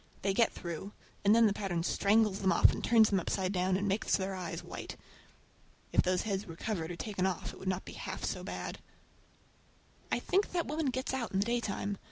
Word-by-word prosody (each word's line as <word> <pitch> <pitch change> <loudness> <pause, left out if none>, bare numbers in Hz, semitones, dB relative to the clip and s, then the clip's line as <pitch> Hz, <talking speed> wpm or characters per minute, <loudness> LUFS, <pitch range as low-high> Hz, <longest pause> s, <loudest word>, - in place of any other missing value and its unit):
They 195 0 +2
get 230 +3 +3
through, 170 +4 -6 0.3
and 205 +2 +6
then 230 0 +6
the 205 - +4
pattern 185 -5 -2
strangles 205 +2 +3
them 190 -1 +2
off - - +6
and - - -5
turns 225 -2 +5
them 195 - +3
upside 185 +2 -1
down, 185 0 +2
and 200 +1 -1
makes 200 +2 +1
their 190 0 -2
eyes 180 -2 -5
white! - - -7 0.9
If - - +5
those 180 0 +1
heads 200 -1 -2
were 165 - -8
covered 170 -4 -3
or 175 - -4
taken 190 0 -1
off 185 -3 -3
it - - -12
would 190 - -7
not 185 0 -2
be - - -8
half - - -6
so - - -3
bad. - - -5 1.3
I - - +3
think 395 +1 0
that 345 -2 +1
woman 305 0 -1
gets 260 +1 -1
out 250 -5 -2
in - - +1
the 200 - +2
daytime! 215 -4 -1
200 Hz, 220 wpm, -32 LUFS, 185-225 Hz, 1.3 s, and